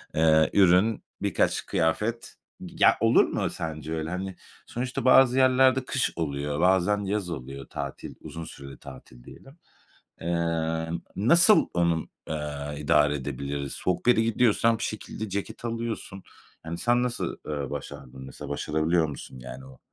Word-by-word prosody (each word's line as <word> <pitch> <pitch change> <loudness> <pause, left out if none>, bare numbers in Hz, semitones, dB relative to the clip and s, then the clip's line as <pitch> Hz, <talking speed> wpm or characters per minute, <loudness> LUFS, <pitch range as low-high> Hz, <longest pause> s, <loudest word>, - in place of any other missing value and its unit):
eee, 80 0 +4
ürün, 95 +3 +4 0.2
birkaç - - 0
kıyafet. 105 +9 -1 0.3
Gi - - -11
ya, - - +6
olur - - +5
mu - - -2
sence 80 -1 -5
öyle? 80 0 -3
Hani, 95 +1 -4 0.3
sonuçta 125 +1 -4
bazı 130 0 +6
yerlerde 130 0 +4
kış 130 0 -1
oluyor, 75 -2 -3
bazen 95 +3 +2
yaz 100 -2 -2
oluyor 70 -3 -7
tatil, - - -6
uzun 80 0 -7
süreli 70 -3 -10
tatil 65 -3 -13
diyelim. 135 - -15 0.6
Emm, 80 -1 -1 0.2
nasıl 170 - +6
onu 85 -1 +2
m 80 - -3 0.3
eee, 75 -1 -4
idare 75 0 +3
edebiliriz? 70 0 -4
Soğuk 90 +5 -2
bir - - +7
yere 110 - +3
gidiyorsan 115 0 +2
bir 115 - -7
şekilde 110 0 -5
ceket 100 +4 -5
alıyorsun. 115 -4 -4 0.4
Yani, 85 +1 -5
sen 120 +4 +2
nasıl, 125 -1 -2
eee, 70 -3 -4
başardın 65 +1 -8
mesela, 70 +2 -9
başarabiliyor 80 +3 0
musun 65 -2 -9
yani 65 +1 -9
o 65 -1 -15
85 Hz, 150 wpm, -26 LUFS, 75-110 Hz, 0.6 s, bir